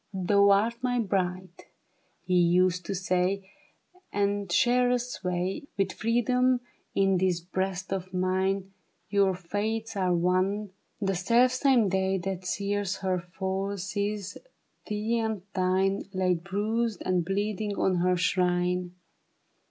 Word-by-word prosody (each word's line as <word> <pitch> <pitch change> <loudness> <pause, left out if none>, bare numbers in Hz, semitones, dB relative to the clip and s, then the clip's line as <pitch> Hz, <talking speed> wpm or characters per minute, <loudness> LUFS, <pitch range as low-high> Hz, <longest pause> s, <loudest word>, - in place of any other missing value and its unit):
^' 185 -2 -3
Thou 200 0 +5
art 225 +4 +2
my 250 -1 0
bride," 185 -3 -2 0.6
he 185 - -1
used 180 0 +3
to 195 - -2
say; 185 +1 0 0.3
" - - -46 0.3
And 200 -2 0
sharest 245 +2 +2
sway 180 +7 -3
With 195 -1 +1
freedom 250 +2 +2 0.3
in 195 -1 +3
this 185 -2 +1
breast 185 +2 -3
of 185 -1 -4
mine; 190 +1 0 0.4
Your 200 -2 +3
fates 215 +5 -3
are 185 -2 +1
one; 185 +4 +1 0.3
the 195 -2 0
self 235 +8 +3
same 255 -4 +3
day 190 0 +1
That 190 0 -4
sees 200 +1 -1
her 185 -1 +1
fall, 190 +3 -3
sees 200 +1 -3 0.5
thee 215 +3 -1
and 220 -4 -2
thine 190 +2 +1
Laid 180 -3 0
bruised 215 +3 -1
and 185 -2 +1
bleeding 205 +2 -2
on 185 -1 +2
her 180 +1 +2
shrine.' 180 0 0
195 Hz, 130 wpm, -28 LUFS, 185-210 Hz, 0.6 s, Thou